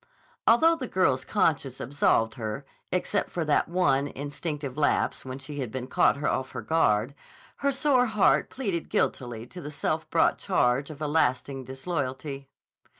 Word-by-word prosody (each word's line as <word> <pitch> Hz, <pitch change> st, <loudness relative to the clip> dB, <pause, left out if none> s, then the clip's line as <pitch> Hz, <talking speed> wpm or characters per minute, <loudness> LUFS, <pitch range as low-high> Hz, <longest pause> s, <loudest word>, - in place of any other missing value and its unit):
Although 325 Hz, +9 st, +5 dB
the 260 Hz, -5 st, -4 dB
girl's 130 Hz, -11 st, +2 dB
conscience 145 Hz, -, 0 dB
absolved 115 Hz, -4 st, +1 dB
her, 115 Hz, +3 st, -5 dB, 0.3 s
except 190 Hz, +2 st, 0 dB
for 170 Hz, -2 st, -2 dB
that 150 Hz, -, +2 dB
one, 145 Hz, -6 st, +2 dB
instinctive 145 Hz, -1 st, -5 dB
lapse 145 Hz, -2 st, +1 dB
when 130 Hz, 0 st, -5 dB
she 145 Hz, +2 st, -7 dB
had 125 Hz, -5 st, -3 dB
been 130 Hz, 0 st, -4 dB
caught 140 Hz, +2 st, +2 dB
off 130 Hz, -3 st, -1 dB
her -, -, -5 dB
guard, 125 Hz, -6 st, +2 dB, 0.4 s
her 280 Hz, -, +1 dB
sore 265 Hz, -2 st, +3 dB
heart 215 Hz, -3 st, +3 dB
pleaded 195 Hz, -11 st, -3 dB
guilty 120 Hz, -3 st, -1 dB
to 180 Hz, +8 st, -10 dB
the 145 Hz, -, -6 dB
self 145 Hz, -, -2 dB
brought -, -, +3 dB
charge 125 Hz, +3 st, +1 dB
of 155 Hz, 0 st, -7 dB
a -, -, 0 dB
lasting 135 Hz, -3 st, 0 dB
disloyalty. 135 Hz, 0 st, -4 dB
145 Hz, 155 wpm, -27 LUFS, 130-175 Hz, 0.4 s, Although